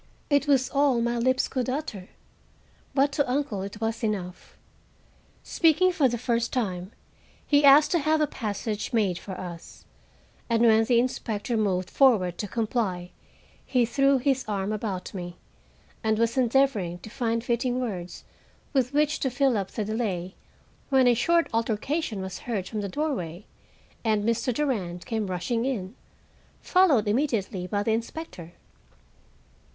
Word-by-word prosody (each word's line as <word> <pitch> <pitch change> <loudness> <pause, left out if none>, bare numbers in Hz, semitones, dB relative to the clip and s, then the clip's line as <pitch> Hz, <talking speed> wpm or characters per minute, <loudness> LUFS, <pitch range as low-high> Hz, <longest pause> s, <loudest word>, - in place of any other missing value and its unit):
It 285 0 +3
was 270 -3 +3
all 275 -3 +3
my 235 0 0
lips 255 +2 +2
could 255 -1 -2
utter, 255 -9 -4 0.9
but 280 +1 +3
to 280 -3 0
uncle 260 -8 -1
it 200 +2 -7
was 225 +1 -2
enough. 190 -5 -4 0.9
Speaking 345 +3 +3
for 300 -7 +2
the 240 - -2
first 235 0 -1
time, 190 -6 -2 0.5
he 290 0 +3
asked 285 +2 +7
to 345 - +3
have 310 +1 +2
a 305 - +3
passage 215 -2 -4
made 195 -6 +1
for 190 - -8
us, 170 -2 -9 0.6
and 230 0 +2
when 225 -1 +5
the 240 0 +3
inspector 235 -1 -2
moved 190 -4 0
forward 210 -11 +3
to 205 - -2
comply, 210 -5 -2 0.5
he 250 -3 +2
threw 275 +3 +3
his 265 0 +1
arm 200 -1 -2
about 200 -4 -4
me, 175 -2 -6 0.7
and 220 -1 +1
was 230 +1 +1
endeavoring 245 -8 +2
to 220 - -11
find 230 -2 -1
fitting 245 +1 0
words 185 -8 -5 0.5
with 265 -1 +1
which 300 +1 +2
to 265 - 0
fill 265 0 +2
up 195 -2 -2
the 215 - -3
delay, 200 -5 -2 0.6
when 265 -2 +4
a 245 - +6
short 335 +8 +2
altercation 230 - -1
was 190 0 -6
heard 205 -6 -3
from 215 -2 -4
the 200 - -4
doorway, 205 - -3 0.6
and 215 -2 +1
Mr. 230 +3 0
Durand 210 -11 -2
came 220 -4 -2
rushing 190 +6 -1
in, 220 -7 -3 0.7
followed 315 - +3
immediately 210 -6 -1
by 205 +2 -1
the 225 - 0
inspector. 225 - -5
230 Hz, 150 wpm, -26 LUFS, 200-265 Hz, 0.9 s, asked